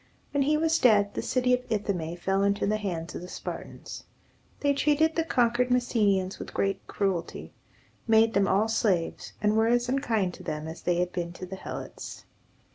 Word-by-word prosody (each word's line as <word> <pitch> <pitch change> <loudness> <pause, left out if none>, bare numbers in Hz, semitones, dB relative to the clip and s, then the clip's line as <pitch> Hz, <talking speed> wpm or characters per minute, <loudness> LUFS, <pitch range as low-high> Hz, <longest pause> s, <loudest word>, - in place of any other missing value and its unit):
When 285 - +2
he 300 +3 +3
was 325 +1 +2
dead, 205 -4 +4
the - - -2
city 250 -1 +1
of 250 - +3
Ithome 185 -6 -2
fell 190 +2 0
into 200 +1 +1
the 210 +1 +1
hands 170 -6 -4
of - - -6
the 180 - -8
Spartans. - - -7 0.6
They 285 -1 +3
treated 300 +3 +2
the 330 - +2
conquered 245 -4 +2
Messenians 210 -7 +1
with - - -8
great 195 0 -1
cruelty, 190 -4 -2 0.5
made 225 0 +5
them 200 -1 +3
all 200 +4 +3
slaves, 195 -6 0
and 210 0 +3
were 220 0 +3
as 240 +1 +2
unkind 225 -9 0
to - - -11
them 155 -1 -4
as 160 +1 -8
they 175 - +1
had 180 +1 0
been 175 -1 -4
to 185 - -7
the 185 +1 -7
Helots. - - -8
210 Hz, 190 wpm, -27 LUFS, 185-245 Hz, 0.6 s, made